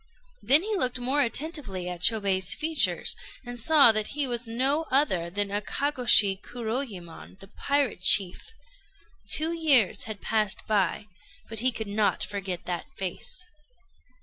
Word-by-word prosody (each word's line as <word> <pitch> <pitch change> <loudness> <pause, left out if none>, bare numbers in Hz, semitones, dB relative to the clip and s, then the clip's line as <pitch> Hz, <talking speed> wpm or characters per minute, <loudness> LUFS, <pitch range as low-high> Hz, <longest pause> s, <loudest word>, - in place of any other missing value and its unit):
Then 290 +6 +5
he 430 +1 -3
looked 255 -9 0
more 265 +4 0
attentively 255 - -3
at 180 -1 -7
Chôbei's 195 -3 +1
features, 320 0 +2 0.3
and 245 0 -8
saw 285 -1 +6
that 215 +5 -4
he 290 - +2
was 240 -1 -3
no 270 +7 0
other 190 - +2
than 200 +3 -2
Akagôshi 210 -2 +1
Kuroyémon, 220 -8 -7
the 195 0 -16
pirate 280 -8 -2
chief. 195 - +3 0.8
Two 320 +2 +1
years 290 - +3
had 215 -2 -7
passed 215 -2 -2
by, 205 -2 -1 0.4
but 225 -1 -6
he 255 +3 +1
could 220 -2 -6
not 205 +1 -1
forget 195 -3 -6
that 180 +8 -5
face. 195 - -4
225 Hz, 140 wpm, -25 LUFS, 195-280 Hz, 0.8 s, saw